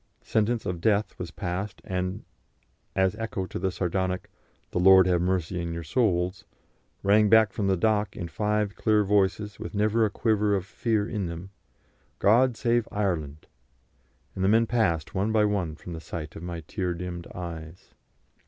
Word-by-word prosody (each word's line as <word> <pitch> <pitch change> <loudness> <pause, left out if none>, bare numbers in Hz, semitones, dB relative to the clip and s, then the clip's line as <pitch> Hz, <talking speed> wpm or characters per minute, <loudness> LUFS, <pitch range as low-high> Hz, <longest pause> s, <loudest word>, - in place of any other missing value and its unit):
Sentence 110 +1 0
of 90 -3 -3
death 105 +1 +2
was 90 - -4
passed, 90 +4 -4
and, 90 0 -3 0.7
as 95 0 +2
echo 110 -4 -3
to - - -6
the 95 +1 0
sardonic 90 0 -2 0.4
"The - - -1
Lord 95 0 +7
have 90 -2 +2
mercy 90 -1 -1
on 85 -1 -3
your 85 - -5
souls," 90 - 0 0.6
rang 105 +1 +5
back 110 -2 +5
from 100 - -1
the 95 -1 +2
dock 105 +1 +1
in 90 - -4
five 105 +2 -1
clear 105 -1 +2
voices, 105 +1 +1
with - - -6
never 110 +2 +2
a 110 - +3
quiver 105 -1 +1
of 95 -2 -2
fear 110 0 -1
in 105 -6 -2
them, 85 +3 -7 0.7
"God 120 +3 +4
save 120 -1 +1
Ireland!" 80 -8 -2 0.9
and 95 - -3
the 95 - +4
men 115 +2 +5
passed 100 -10 0
one 100 +2 0
by 110 -1 +4
one 95 -7 -1
from 90 - -9
the 80 - -6
sight 80 -2 -7
of - - -8
my 85 -1 -5
tear 90 +2 -3
dimmed 85 0 -6
eyes. 85 -1 -8
95 Hz, 170 wpm, -27 LUFS, 90-105 Hz, 0.9 s, Lord